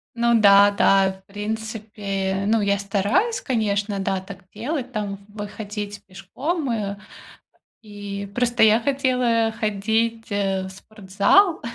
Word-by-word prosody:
Ну 235 0 +3
да, 200 0 +7
да, 195 -1 +3
в 190 0 -18
принципе, 205 -2 -4
ну, 220 +1 +2
я 200 -1 +1
стараюсь, 205 - 0
конечно, 210 -4 -1
да, 195 -1 -1
так 190 0 -11
делать 260 +3 -4
там, 205 -3 -3
выходить 205 0 -7
пешком, 260 - -4
э. 205 -3 -2 0.9
И 205 -2 -7
просто 240 0 0
я 220 0 +6
хотела 250 -3 +1
ходить, 225 +1 -1
э, 195 -2 -1
в - - -7
спортзал, 210 - +1
210 Hz, 125 wpm, -22 LUFS, 200-230 Hz, 0.9 s, да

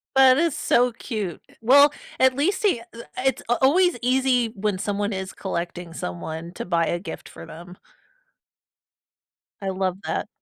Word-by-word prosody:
That 265 -1 +7
is 330 -3 +1
so 245 0 +3
cute. 215 -6 -5 0.2
Well, 280 +5 +7 0.3
at 260 -1 +4
least 345 +10 0
he 315 - +2
eh 235 0 -12 0.2
it's 265 -3 +1
a 240 - +4
always 350 +4 +4
easy 255 -1 +2
when 200 -1 -1
someone 205 +1 -2
is 190 0 -4
collecting 175 -3 -5
someone 160 - -6
to - - -5
buy 170 -2 +1
a 175 - -1
gift 170 -3 -8
for - - -11
them. 175 +2 -11 1.8
I 195 - -2
love 185 -1 -1
that. - - -2
215 Hz, 155 wpm, -24 LUFS, 180-260 Hz, 1.8 s, That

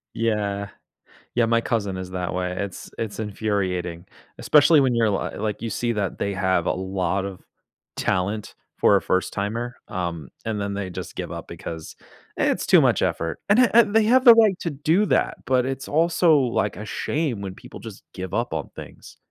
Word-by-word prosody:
Yeah. 100 -3 -1 0.7
Yeah, 120 - +4
my 115 0 +2
cousin 100 -6 -1
is 90 0 -6
that 90 -1 -3
way; 90 0 -2
it's 100 -3 -6
it's 110 -2 -4
infuriating. 95 -5 -2 0.3
Especially 150 +1 +5
when 130 -3 +3
you're 115 -2 +2
li 100 - -2
like, 105 -1 -3
you 115 - -2
see 120 +3 -1
that 100 -4 -3
they 100 - -1
have 95 -2 +1
a - - +3
lot 95 0 -2
of 95 -2 -7 0.5
talent 100 +3 -1 0.2
for - - +5
a - - +3
first 95 0 0
timer, 115 +5 -3
um, 85 -6 -4 0.2
and 110 -2 -2
then 100 0 -3
they 100 -2 -4
just - - -7
give - - -5
up - - -7
because, 80 -1 -8 0.4
"it's - - 0
too - - +7
much - - +3
effort," 80 -1 -1
and 205 - +5
a 250 -3 +4
and 225 -3 +5
they 225 - +6
have 255 +4 +4
the 235 -2 +11
right 215 -5 +4
to 170 - -2
do 160 +8 +1
that, - - +1
but 130 -1 +2
it's 135 0 -4
also, 165 0 +3
like, 115 -6 0
a 105 - -6
shame 140 0 -2
when 95 -2 -6
people - - -12
just - - -10
give 95 -1 -6
up - - -1
on - - -3
things. - - -11
105 Hz, 195 wpm, -23 LUFS, 95-135 Hz, 0.7 s, the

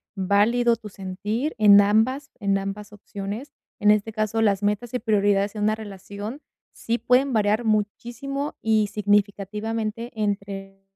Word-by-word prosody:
válido 215 +5 +3
tu 220 -2 -10
sentir 205 +9 -3
en 205 -1 +8
ambas 225 +8 +2
en 200 -1 +1
ambas 200 +2 -5
opciones. 205 +5 -7 0.3
En 210 0 +5
este 210 +1 +1
caso, 215 +1 -1
las 205 -2 +2
metas 210 +4 -1
y - - 0
prioridades 205 -2 +1
en 210 - -5
una 215 +1 +2
relación 205 +5 -8 0.3
sí 235 +1 -2
pueden 255 +2 +2
variar 215 +2 +2
muchísimo 240 +7 -2
y 215 -2 +3
significativamente 210 +3 -1
entre 195 -1 -3
210 Hz, 135 wpm, -24 LUFS, 200-230 Hz, 0.3 s, en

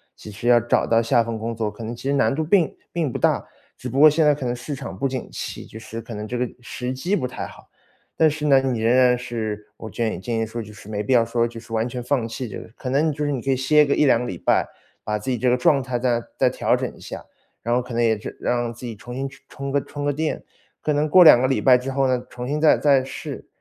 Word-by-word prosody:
其 105 - -11
实 115 +4 -6
要 120 -1 +7
找 120 +1 +1
到 115 0 +3
下 115 0 +3
份 115 -1 -4
工 115 +1 -4
作， 110 -1 -1
可 105 +2 -10
能 115 +2 -5
其 - - -12
实 140 +1 0
难 115 -4 +2
度 160 +3 -1
并 170 0 +2 0.2
并 160 -6 -1
不 - - -3
大。 - - +1 0.3
只 125 - -6
不 130 +3 -1
过 155 - +9
现 155 +2 +3
在 150 -1 +4
可 140 - -6
能 120 0 -1
市 140 +4 -6
场 95 -7 -7
不 120 +8 -1
景 130 -2 -4
气， - - -6
就 110 - -11
是 115 0 -7
可 115 - -8
能 105 0 -5
这 125 +2 -3
个 125 - 0
时 125 +1 -5
机 170 +10 -1
不 130 - -1
太 125 - -6
好。 - - -15 0.5
但 160 - +4
是 150 0 -4
呢， 135 -2 +5
你 130 -3 -1
仍 115 +2 +3
然 125 -1 +5
是 110 -4 -5
我 110 - -9
建议 115 -1 -2
建 115 +4 -3
议 115 - 0
说， 115 +2 -5
就 105 -1 -10
是 105 0 -14
没 105 -1 -3
必 105 - -3
要 115 -2 +5
说 115 0 0
就 115 -1 -9
是 115 0 -11
完 115 +2 0
全 125 0 -5
放 125 -2 0
弃 120 +2 -5
这 105 - -7
个。 - - -11
可 125 - -5
能 150 +4 +2
就 150 +1 -3
是 145 - 0
你 130 - -2
可 135 - -4
以 135 - +2
歇 150 +4 +4
个 140 -1 +1
1-2 135 -6 +4
个 125 - -3
礼 90 - -5
拜， - - +2 0.4
把 105 0 -1
自 130 +5 -4
己 125 - 0
这 125 - +2
个 125 - +3
状 135 +2 +3
态 125 -1 -3
再 120 -1 +1 0.2
再 - - +3
调 - - +1
整 - - -4
一 - - -17
下， - - -8 0.4
然 120 - 0
后 125 - +2
可 125 -1 -7
能 120 - +2
也 110 -2 +2
是 - - -8
让 120 -1 -1
自 120 +2 -10
己 115 -2 -5
重 120 +4 -9
新 135 +1 -2
充 135 - -14
充 140 0 -6
个 140 0 +1
充 145 0 -6
个 145 - +1
电。 155 +2 -2 0.4
可 150 - 0
能 150 +1 +1
过 180 +4 +8
2 125 -7 +8
个 130 - +3
礼 135 - +1
拜 130 -2 +6
之 125 +2 -2
后 135 0 +1
呢， 125 -1 0
重 125 0 -6
新 150 +3 -2
再 155 - +6
再 140 -3 +3
试。 135 0 -7
125 Hz, 320 characters per minute, -22 LUFS, 115-140 Hz, 0.5 s, 过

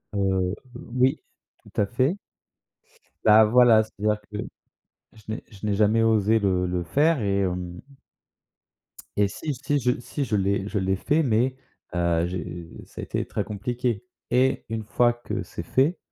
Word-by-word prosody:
heu, 95 -1 +1 0.2
o 125 - -8
oui, 130 +4 +2 0.4
tout - - -3
à - - +3
fait. 130 - 0 1.1
Bah 110 0 +8
voilà, 115 0 +6
c'est-à-dire 105 0 -2
que 105 - -6 0.8
je 110 - -17
n'ai 110 - -4
je 105 -1 -9
n'ai 105 - +1
jamais 110 +2 +3
osé 110 0 +3
le 95 -3 +1
le 90 0 -1
faire 145 - +2
et 100 -1 +1
hem 90 -1 -3 1.4
et 100 -1 +3
si, 150 +7 -4
si 140 +3 -1
je 125 -1 +1
si 140 +3 -3
je 105 -3 0
l'ai 100 0 0
je 105 - -1
l'ai 95 0 +1
fait, 155 - +1
mais, 125 0 +1 0.4
heu, 85 -1 +1
j'ai 85 -1 -5 0.2
ça - - -10
a - - -4
été - - -2
très - - -2
compliqué 120 +2 -2 0.3
et 130 +2 +2
une 110 -1 -3
fois 120 +3 +3
que 120 0 -5
c'est 85 - -7
fait, 135 - +1
110 Hz, 170 wpm, -25 LUFS, 95-125 Hz, 1.4 s, Bah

